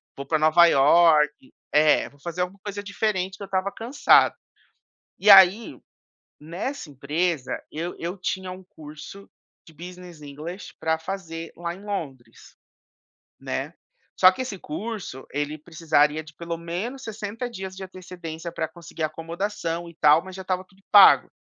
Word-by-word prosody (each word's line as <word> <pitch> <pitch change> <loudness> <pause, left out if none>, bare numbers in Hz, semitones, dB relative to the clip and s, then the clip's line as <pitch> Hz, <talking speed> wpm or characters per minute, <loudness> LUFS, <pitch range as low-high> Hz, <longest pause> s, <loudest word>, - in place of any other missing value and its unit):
vou 140 - -7
para 155 +2 0
Nova 155 +2 +6
Iorque" 150 -1 +4 0.2
É, 150 0 +4
vou 145 - -24
fazer 170 +4 -5
alguma 180 +2 -4
coisa 205 -1 -5
diferente, 200 -2 -2
que - - -9
eu - - -5
estava 190 +1 -1
cansado. 250 +6 +3 0.8
E 210 - +3
aí, 195 +3 +7 0.6
nessa 175 - -6
empresa, 145 +1 -2
eu 170 +3 -5
eu 175 +4 -5
tinha 185 0 -3
um 185 +1 -10
curso 155 +3 -12 0.4
de 160 - -17
Business 175 0 -11
English 150 +6 -8
para 160 0 0
fazer 165 -2 -6
lá 170 0 -4
em 190 +3 -13
Londres, 135 - -7 0.8
né. - - -4 0.5
Só 185 0 +8
que 190 - -6
esse 210 -7 -6
curso, 190 - -6
ele 145 +1 -2
precisaria 155 -1 +1
de 150 0 -15
pelo 170 0 -5
menos 185 +11 -5
60 220 +2 -5
dias 190 -4 -7
de 190 - -8
antecedência 175 -3 -8
para 165 -1 -3
conseguir 165 0 -12
acomodação 170 +2 -4
e 170 - -16
tal, 150 +2 +5
mas 190 -1 -10
já 190 - -7
estava 185 0 -2 0.3
pago. 205 -1 +8
170 Hz, 150 wpm, -24 LUFS, 155-190 Hz, 0.8 s, Só